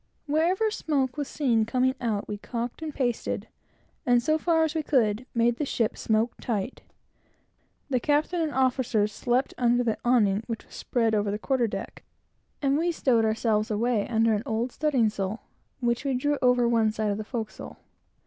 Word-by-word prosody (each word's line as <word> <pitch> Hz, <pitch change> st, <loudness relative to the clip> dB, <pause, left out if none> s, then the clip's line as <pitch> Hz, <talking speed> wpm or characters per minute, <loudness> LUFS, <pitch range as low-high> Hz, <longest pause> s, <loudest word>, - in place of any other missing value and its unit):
Wherever 345 Hz, +9 st, +1 dB
smoke 275 Hz, -, -1 dB
was 290 Hz, -2 st, -3 dB
seen 240 Hz, -7 st, +1 dB
coming 255 Hz, +3 st, +1 dB
out, 215 Hz, -4 st, -1 dB
we 205 Hz, -1 st, -5 dB
calked 235 Hz, +5 st, -5 dB
and 315 Hz, -1 st, -4 dB
pasted, 245 Hz, -5 st, -2 dB, 0.6 s
and, 245 Hz, -1 st, +4 dB
so 310 Hz, +4 st, +2 dB
far 325 Hz, 0 st, +2 dB
as 315 Hz, -1 st, 0 dB
we 320 Hz, -, 0 dB
could, 250 Hz, -5 st, +1 dB
made 235 Hz, 0 st, +2 dB
the -, -, -1 dB
ship 230 Hz, -5 st, 0 dB
smoke 220 Hz, +2 st, 0 dB
tight. 225 Hz, 0 st, -3 dB, 1.1 s
The 255 Hz, -3 st, +1 dB
captain 300 Hz, +6 st, +1 dB
and 315 Hz, -2 st, 0 dB
officers 250 Hz, -5 st, +1 dB
slept 250 Hz, +4 st, 0 dB
under 245 Hz, 0 st, +3 dB
the 225 Hz, -2 st, -1 dB
awning 215 Hz, -5 st, +3 dB
which 230 Hz, -2 st, -5 dB
was -, -, -19 dB
spread 230 Hz, -3 st, 0 dB
over 205 Hz, -1 st, +1 dB
the 205 Hz, -, -1 dB
quarter 245 Hz, +1 st, 0 dB
deck; 195 Hz, -2 st, -6 dB, 0.6 s
and 275 Hz, +1 st, +2 dB
we 345 Hz, +1 st, +1 dB
stowed 245 Hz, -8 st, +2 dB
ourselves 220 Hz, 0 st, +1 dB
away 220 Hz, 0 st, 0 dB
under 225 Hz, -1 st, +2 dB
an 205 Hz, -, 0 dB
old 230 Hz, +3 st, -2 dB
studding 275 Hz, -7 st, +2 dB
sail, 200 Hz, +1 st, -4 dB, 0.4 s
which 240 Hz, +1 st, 0 dB
we 275 Hz, -2 st, 0 dB
drew 290 Hz, +3 st, 0 dB
over 250 Hz, -1 st, +4 dB
one 230 Hz, -2 st, +3 dB
side 215 Hz, -1 st, -1 dB
of 200 Hz, -, -3 dB
the -, -, -3 dB
forecastle. 220 Hz, -1 st, -6 dB
240 Hz, 180 wpm, -27 LUFS, 220-275 Hz, 1.1 s, and